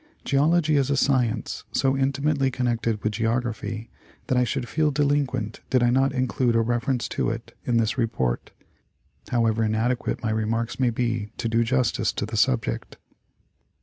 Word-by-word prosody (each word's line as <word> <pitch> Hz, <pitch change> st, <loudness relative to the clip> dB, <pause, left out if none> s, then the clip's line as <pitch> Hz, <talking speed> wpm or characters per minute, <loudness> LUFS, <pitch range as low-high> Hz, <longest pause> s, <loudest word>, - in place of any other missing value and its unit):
Geology 155 Hz, +2 st, +3 dB
is 140 Hz, -1 st, +1 dB
a 140 Hz, -, +1 dB
science 125 Hz, -5 st, +1 dB
so 135 Hz, 0 st, +2 dB
intimately 135 Hz, +1 st, +1 dB
connected 115 Hz, -4 st, -1 dB
with 110 Hz, -, +1 dB
Geography 115 Hz, -1 st, -2 dB, 0.3 s
that 130 Hz, -, 0 dB
I 125 Hz, -, +4 dB
should 120 Hz, 0 st, -2 dB
feel 155 Hz, +2 st, +1 dB
delinquent 140 Hz, -6 st, 0 dB
did 130 Hz, -2 st, +3 dB
I 120 Hz, -, +4 dB
not 135 Hz, +2 st, +3 dB
include 125 Hz, -2 st, 0 dB
a 115 Hz, -, +4 dB
reference 120 Hz, +2 st, 0 dB
to -, -, -1 dB
it 115 Hz, +1 st, -6 dB
in 120 Hz, -2 st, +2 dB
this 115 Hz, +3 st, +1 dB
report, 65 Hz, -, -1 dB, 0.8 s
however 115 Hz, -2 st, +2 dB
inadequate 120 Hz, +3 st, -1 dB
my 110 Hz, -, 0 dB
remarks 115 Hz, +3 st, -1 dB
may 130 Hz, -2 st, +3 dB
be 115 Hz, -2 st, -1 dB
to 115 Hz, -, -2 dB
do 115 Hz, +1 st, +2 dB
justice 125 Hz, +1 st, +1 dB
to -, -, -2 dB
the -, -, -6 dB
subject. 60 Hz, -, 0 dB
120 Hz, 160 wpm, -25 LUFS, 115-135 Hz, 0.8 s, I